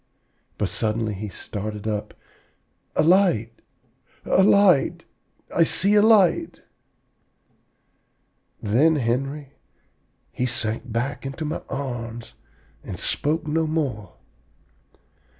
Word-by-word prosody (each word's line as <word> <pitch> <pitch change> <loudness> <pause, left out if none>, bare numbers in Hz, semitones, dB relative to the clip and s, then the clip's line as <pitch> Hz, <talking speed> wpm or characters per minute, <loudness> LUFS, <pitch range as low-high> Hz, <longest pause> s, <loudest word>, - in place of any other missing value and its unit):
But 100 -4 -1
suddenly 110 0 -1
he 105 +2 -6
started 105 +1 -6
up, 105 -1 -3 0.8
'A - - +3
light, 170 - +3 0.7
a - - +3
light! 195 -6 +4 0.5
I 170 - +5
see 195 +5 +3
a 210 - +6
light!' 210 -6 +3 2.0
Then, 135 +10 +3
Henry, 135 +3 -2 0.8
he 125 - -2
sank 115 0 -2
back 120 +5 -2
into 135 +4 -5
my 150 - -3
arms 120 -4 -5 0.5
and - - -7
spoke 155 +2 -1
no 160 +1 0
more. 130 - -3
135 Hz, 95 wpm, -23 LUFS, 110-160 Hz, 2.0 s, a